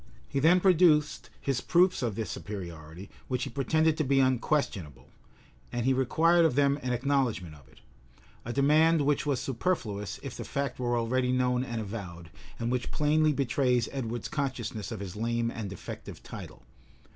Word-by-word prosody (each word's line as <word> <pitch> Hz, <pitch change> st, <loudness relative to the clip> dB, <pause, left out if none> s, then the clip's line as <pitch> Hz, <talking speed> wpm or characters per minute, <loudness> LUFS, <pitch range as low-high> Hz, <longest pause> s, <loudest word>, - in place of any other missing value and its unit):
He 140 Hz, -, -1 dB
then 165 Hz, +6 st, +5 dB
produced 170 Hz, -5 st, +3 dB
his 135 Hz, -3 st, -1 dB
proofs 180 Hz, +1 st, +3 dB
of 115 Hz, -5 st, -1 dB
this 110 Hz, 0 st, -3 dB
superiority, 85 Hz, -2 st, -8 dB, 0.2 s
which 125 Hz, -1 st, -1 dB
he 135 Hz, -, -4 dB
pretended 155 Hz, +4 st, +1 dB
to 155 Hz, -, +1 dB
be 135 Hz, -1 st, +2 dB
unquestionable, 130 Hz, -, 0 dB, 0.6 s
and 120 Hz, -1 st, -2 dB
he 135 Hz, -, +4 dB
required 165 Hz, +7 st, +3 dB
of 160 Hz, -6 st, +2 dB
them 140 Hz, 0 st, +3 dB
an 125 Hz, -, -2 dB
acknowledgment 125 Hz, -, 0 dB
of 70 Hz, -3 st, -17 dB
it; -, -, -21 dB, 0.6 s
a 120 Hz, -, -5 dB
demand 155 Hz, +4 st, +4 dB
which 145 Hz, +1 st, +1 dB
was 140 Hz, -4 st, +1 dB
superfluous 115 Hz, -, -2 dB
if -, -, -6 dB
the -, -, -6 dB
fact 140 Hz, -2 st, -3 dB
were 120 Hz, -1 st, 0 dB
already 125 Hz, +2 st, +1 dB
known 125 Hz, 0 st, +1 dB
and 120 Hz, -3 st, -4 dB
avowed, 95 Hz, -6 st, -7 dB, 0.3 s
and 115 Hz, +1 st, -2 dB
which 125 Hz, 0 st, -1 dB
plainly 155 Hz, +1 st, +2 dB
betrays 125 Hz, -3 st, +1 dB
Edward's 120 Hz, -3 st, -4 dB
consciousness 120 Hz, -7 st, -3 dB
of 110 Hz, -3 st, -5 dB
his 95 Hz, -1 st, -6 dB
lame 115 Hz, +1 st, -1 dB
and 110 Hz, -4 st, -5 dB
defective 95 Hz, -, -9 dB
title. -, -, -10 dB
125 Hz, 170 wpm, -29 LUFS, 115-145 Hz, 0.6 s, then